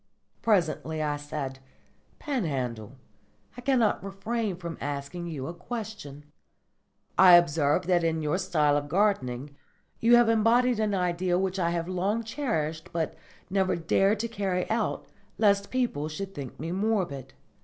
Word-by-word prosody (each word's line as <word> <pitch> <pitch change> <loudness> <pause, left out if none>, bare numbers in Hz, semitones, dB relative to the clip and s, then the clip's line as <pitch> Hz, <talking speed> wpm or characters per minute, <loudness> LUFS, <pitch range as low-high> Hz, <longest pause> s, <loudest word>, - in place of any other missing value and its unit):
Presently 165 -6 +1
I 150 -1 0
said, 145 -2 -5 0.6
"Panhandle, 130 - -3 0.6
I 245 - -8
cannot 245 -7 +2
refrain 200 +1 -3
from 170 -2 -7
asking 145 +5 -4
you 145 -6 -5
a 165 - -5
question. 180 - -7 0.9
I 185 -2 +9
observe 150 -4 +3
that 175 -1 +2
in 160 -1 0
your 150 +5 0
style 155 -6 +2
of 145 0 -3
gardening 145 -8 0 0.4
you 235 +1 +6
have 240 -1 +5
embodied 230 +2 +3
an 210 -2 +1
idea 180 0 0
which 190 0 -1
I 170 -2 +1
have 170 -1 -2
long 195 +5 -1
cherished 165 - -3
but 165 -2 -2 0.4
never 190 -1 +2
dared 195 +5 +2
to 230 - -2
carry 195 -5 -2
out 220 -1 -1 0.3
lest 200 -2 +3
people 235 - -1
should 195 +5 -6
think 140 -6 -8
me 165 +3 -4
morbid. 185 - -1
180 Hz, 145 wpm, -27 LUFS, 150-210 Hz, 0.9 s, I